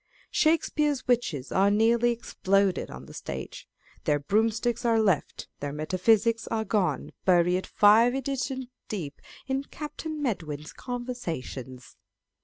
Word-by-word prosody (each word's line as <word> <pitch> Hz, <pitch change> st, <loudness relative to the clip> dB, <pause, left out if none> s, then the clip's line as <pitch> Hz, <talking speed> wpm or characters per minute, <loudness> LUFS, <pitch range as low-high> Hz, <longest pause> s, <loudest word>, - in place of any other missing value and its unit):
Shakespeare's 300 Hz, -3 st, +1 dB
witches 170 Hz, -, 0 dB
are 195 Hz, +1 st, +4 dB
nearly 230 Hz, +3 st, +3 dB
exploded 200 Hz, -5 st, +1 dB
on -, -, -9 dB
the -, -, -12 dB
stage. -, -, -7 dB, 0.4 s
Their 145 Hz, -, +3 dB
broom 210 Hz, +10 st, +2 dB
sticks 235 Hz, +2 st, -2 dB
are 230 Hz, -2 st, +3 dB
left; 195 Hz, -8 st, 0 dB
their 145 Hz, 0 st, -3 dB
metaphysics 200 Hz, +9 st, +2 dB
are 220 Hz, -1 st, -1 dB
gone, 180 Hz, -11 st, 0 dB
buried 180 Hz, 0 st, +3 dB
five 225 Hz, +4 st, +5 dB
editions 265 Hz, -1 st, -2 dB, 0.2 s
deep 160 Hz, -9 st, -5 dB, 0.2 s
in 270 Hz, +1 st, -2 dB
Captain 310 Hz, +1 st, -6 dB
Medwin's 160 Hz, -, -3 dB
Conversations 170 Hz, -, -6 dB
220 Hz, 120 wpm, -27 LUFS, 175-245 Hz, 0.4 s, five